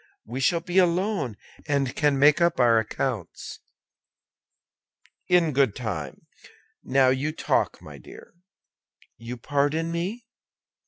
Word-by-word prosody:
We 120 +4 -6
shall 165 +6 +2
be 180 +2 +1
alone, 180 - 0 0.3
and 140 -3 0
can 145 -2 +2
make 145 +4 +5
up 170 -4 +2
our 115 -2 +5
accounts." 110 -3 -4 1.7
"In 175 -3 +3
good 135 -6 +2
time. 85 - -6 0.6
Now 135 -1 +3
you 135 +4 0
talk, 155 - -1
my - - -11
dear." - - -14 0.8
"You 120 +2 -7
pardon 145 +6 -1
me?" 190 +8 -4
140 Hz, 115 wpm, -25 LUFS, 125-170 Hz, 1.7 s, make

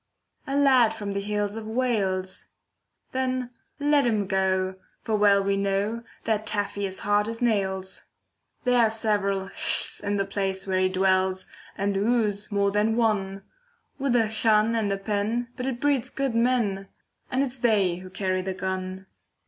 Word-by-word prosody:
A 275 - -2
lad 255 -6 +5
from 205 -2 -4
the 200 - -2
hills 205 0 -2
of 225 -1 -6
Wales. 205 -6 -1 0.6
Then 255 -1 -1 0.3
let 290 0 +3
him 215 -3 +1
go, 190 -1 0 0.3
for 220 - 0
well 200 -1 +4
we 200 0 +1
know, 200 +3 0 0.2
That 215 -1 -1
Taffy 205 -1 0
is 190 0 -5
hard 205 +1 +2
as 230 0 -5
nails. 190 -5 -1 0.6
There 250 -1 +3
are 230 -2 +5
several 205 -3 0
ll's - - +1
in 205 0 0
the 195 - 0
place 195 -1 -2
where 190 -1 0
he 185 0 +3
dwells, 185 0 +1 0.3
And 200 0 0
of 195 - 0
w's 215 -2 0
more 200 -1 +2
than 210 +2 +1
one, 200 -4 0 0.6
With 270 -2 +1
a 230 -2 +4
'Llan' 220 0 +2
and 215 -3 0
a 195 - 0
'pen,' 215 +4 -1
but 250 - -4
it 250 -3 -3
breeds 270 -3 +1
good 275 -2 -2
men, 230 -5 +1 0.4
And 260 +2 +1
it's 260 -1 -4
they 205 -7 +2
who 185 +1 -10
carry 185 0 -1
the 190 0 -4
gun. 190 0 -4
205 Hz, 170 wpm, -26 LUFS, 195-230 Hz, 0.6 s, lad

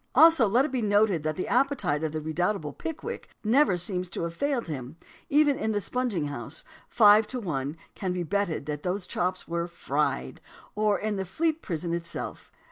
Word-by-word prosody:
Also 325 -8 +7
let 240 +7 +3
it 305 - -4
be 255 -2 0
noted 205 -4 +3
that 155 +1 -2
the 185 - -3
appetite 270 - +1
of 160 - -1
the 155 0 -3
redoubtable 160 0 -1
Pickwick 330 +9 -6
never 225 -3 +4
seems 180 0 -2
to 170 - -4
have 170 0 -3
failed 275 +3 -1
him, 140 -1 -6 0.3
even 290 -1 +4
in 220 -6 0
the 205 - +1
sponging 225 -7 -1
house 140 0 -5 0.3
five 210 -1 +6
to 255 - -4
one 150 - -3 0.2
can 190 -2 -3
be 180 -1 -1
betted 175 -4 -1
that 150 0 -4
those 180 +2 -2
chops 180 0 -2
were 170 0 -2
fried 170 - -2 0.3
or 210 -1 +2
in 215 -1 -2
the 190 - -1
Fleet 320 - -1
Prison 170 -1 -3
itself. 170 0 -5
190 Hz, 190 wpm, -27 LUFS, 165-235 Hz, 0.3 s, Also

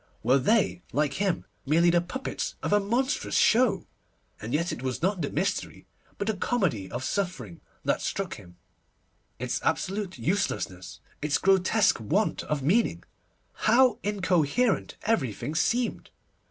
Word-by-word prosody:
Were 130 +5 +4
they, 195 - +2
like 145 -1 +1
him, 195 -4 0 0.2
merely 165 +4 +4
the 170 0 +3
puppets 255 +10 -4
of - - 0
a 205 - +5
monstrous 240 +7 -1
show? 220 -6 +4 0.6
And 110 - -5
yet 170 +5 0
it - - -5
was 130 +4 -3
not 190 -1 +1
the 145 - -1
mystery, 185 +7 -2 0.3
but 200 - -2
the 220 - +1
comedy 180 - -1
of 120 - -5
suffering 130 - -3 0.2
that - - +1
struck - - -3
him; 90 0 -13 0.8
its - - -2
absolute 195 -1 -1
uselessness, 135 - -2 0.2
its 150 0 +1
grotesque 195 +2 +3
want 180 - 0
of 150 -3 -2
meaning. 200 - +2 0.5
How 250 +3 +3
incoherent 195 - +1
everything 150 - -1
seemed! 235 +9 0
180 Hz, 140 wpm, -27 LUFS, 140-210 Hz, 0.8 s, a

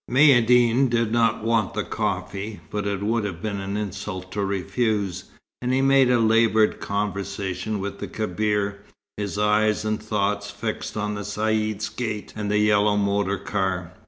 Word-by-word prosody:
Maïeddine 125 -2 +5
did 115 -2 +1
not 115 -2 +2
want 115 -3 +1
the - - 0
coffee, 100 +1 -3
but 105 -1 -2
it 100 -1 -2
would 115 +1 +1
have 95 -5 -4
been 100 +1 -3
an 100 +1 -3
insult 100 -2 -5
to 105 - -2
refuse, 100 0 -1 0.4
and 125 0 -1
he 130 - +2
made 135 -1 +5
laboured 115 -2 +3
conversation 100 0 -3
with 100 +1 -5
the - - -4
Kebir, 105 -1 -1 0.4
his 100 -1 -3
eyes 105 +1 +2
and 110 0 -1
thoughts 105 -1 -1
fixed 110 0 -4
on 105 0 -1
the 105 - -4
Caïd's 110 +1 -1
gate 110 -4 -4
and 105 -1 -3
the 105 - +2
yellow 105 0 +3
motor 100 -1 +1
car. 95 -3 -2
105 Hz, 160 wpm, -24 LUFS, 100-110 Hz, 0.4 s, Maïeddine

